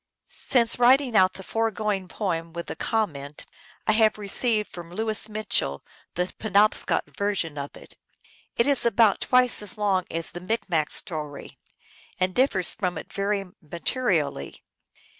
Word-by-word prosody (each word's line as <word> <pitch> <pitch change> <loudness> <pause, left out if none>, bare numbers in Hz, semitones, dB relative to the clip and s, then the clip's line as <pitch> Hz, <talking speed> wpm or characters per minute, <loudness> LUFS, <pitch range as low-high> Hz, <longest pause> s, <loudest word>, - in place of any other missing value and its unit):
Since 235 -2 +2
writing 250 0 +4
out 185 -2 +5
the 190 - -10
foregoing 210 -3 -1
poem, 170 -4 -3
with 170 0 -5
the - - -6
com 220 -4 0
ment, 140 +1 -9 0.4
I - - +3
have 215 0 +3
received 210 +1 -1
from 170 -1 -9
Louis 220 +2 0
Mitchell 210 - -2 0.3
the 180 +1 -2
Pe 215 - -4
nobscot 210 +2 +3
version 200 -7 -1
of 140 -1 -6
it. - - -10 0.6
It 235 - +2
is 280 -2 +4
about 230 -3 +3
twice 250 -3 +4
as 210 +3 0
long 195 -3 +1
as 165 0 -2
the 175 - -8
Micmac 185 -6 -1
story, 150 -4 -5 0.6
and 185 0 +1
differs 215 -8 +2
from 180 -4 -2
it - - -9
very 200 0 -1 0.2
materially. 170 - -1
200 Hz, 150 wpm, -25 LUFS, 175-225 Hz, 0.6 s, out